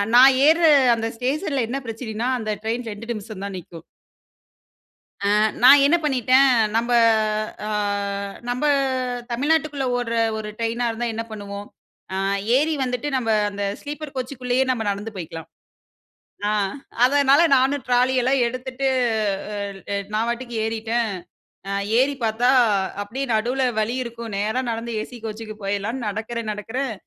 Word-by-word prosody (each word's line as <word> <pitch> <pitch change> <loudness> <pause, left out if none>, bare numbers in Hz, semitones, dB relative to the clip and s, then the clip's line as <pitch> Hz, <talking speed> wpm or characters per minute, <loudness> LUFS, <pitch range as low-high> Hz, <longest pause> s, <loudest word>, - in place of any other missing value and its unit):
நான் 260 +2 +8
ஏர்ற 330 +2 +5 0.3
அந்த 225 0 -2
ஸ்டேஷன்ல 270 +1 -1
என்ன 270 +3 -2
பிரச்சனைன்னா, 225 +1 -3
அந்த 215 -1 -3
ட்ரெயின் 230 +2 -2
2 210 +2 -9
நிமிஷந்தான் 200 -2 -7
நிக்கும். 165 -1 -12 1.4
ஆ - - +3 0.3
நான் 275 +3 +9
என்ன 295 +4 +5
பண்ணிட்டேன்? 260 -1 +4 0.3
நம்ப 235 +2 +1 0.8
ஆ - - -3 0.8
நம்ப 250 +4 -1 0.7
தமிழ்நாட்டுக்குள்ள 290 +2 0
ஓட்ற 230 -1 -2 0.2
ஒரு 215 -1 -5
ட்ரெயினா 230 +1 -1
இருந்தா 235 +1 -2
என்ன 225 +1 -3
பண்ணுவோம்? 205 -1 -7 0.5
ஆ - - -2 0.4
ஏறி 310 +3 +1
வந்துட்டு 250 +2 -2
நம்ப 230 -3 -1 0.2
அந்த 200 0 -5 0.2
ஸ்லீப்பர் 295 0 -7
கோச்சுக்குள்ளயே 255 0 -1
நம்ம 230 -4 -2
நடந்து 205 +2 -4
போய்க்கலாம். 165 -3 -7 1.0
ஆ - - +1 0.5
அதனால 280 +2 +4
நானும் 270 +2 +1
ட்ராலி 250 +1 +3
எல்லாம் 260 +1 +2
எடுத்துட்டு 255 +2 -3 0.7
அல் 200 -1 -5 0.4
நான் 225 +2 +1
பாட்டுக்கு 240 0 -4
ஏறிட்டன். 225 +1 -1 0.6
அ - - -2 0.3
ஏறி 275 +2 +3
பாத்தா, 225 +3 +2 0.5
அப்டியே 255 +7 -4
நடுவுல 245 +5 0 0.2
வழி 220 +3 0
இருக்கும். 235 -2 -7
நேரா 215 +5 0
நடந்து 230 +1 -4
ஏசி 245 +3 -8
கோச்சுக்கு 215 0 -6
போயிடலான்னு 205 +5 -2
நடக்கறேன், 220 +1 -4
நடக்கறேன். 225 +4 -4
235 Hz, 130 wpm, -22 LUFS, 220-260 Hz, 1.4 s, நான்